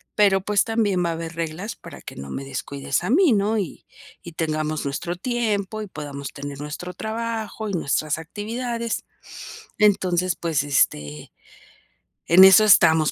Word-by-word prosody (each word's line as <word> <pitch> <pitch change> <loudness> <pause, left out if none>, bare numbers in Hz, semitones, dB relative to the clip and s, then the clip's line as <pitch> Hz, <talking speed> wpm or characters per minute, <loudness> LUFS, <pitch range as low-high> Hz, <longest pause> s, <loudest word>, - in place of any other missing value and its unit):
pero 195 -2 +4
pues, 205 +1 +2
también 205 -6 0
va - - 0
a - - 0
haber 165 0 -6
reglas 165 +6 -4
para - - -12
que - - -10
no 70 0 -8
me 135 - -5
descuides 135 0 -3
a - - -1
mí, 335 +2 +5
¿no? 215 +1 +2
Y 190 - -6 0.4
y 170 - -9
tengamos 155 -2 -2
nuestro 145 +5 -3
tiempo 215 -1 -2
y - - -8
podamos 140 -5 -7
tener 140 -1 -7
nuestro 170 +4 -6
trabajo 220 0 -4
y - - -4
nuestras 155 -3 0
actividades". 230 +6 -4 0.7
Entonces, 185 -4 +2
pues, 160 -4 -1
este, 75 - 0 0.9
en 180 +3 +7
eso 190 +3 +9
estamos 160 -6 +5
180 Hz, 155 wpm, -23 LUFS, 155-215 Hz, 0.9 s, eso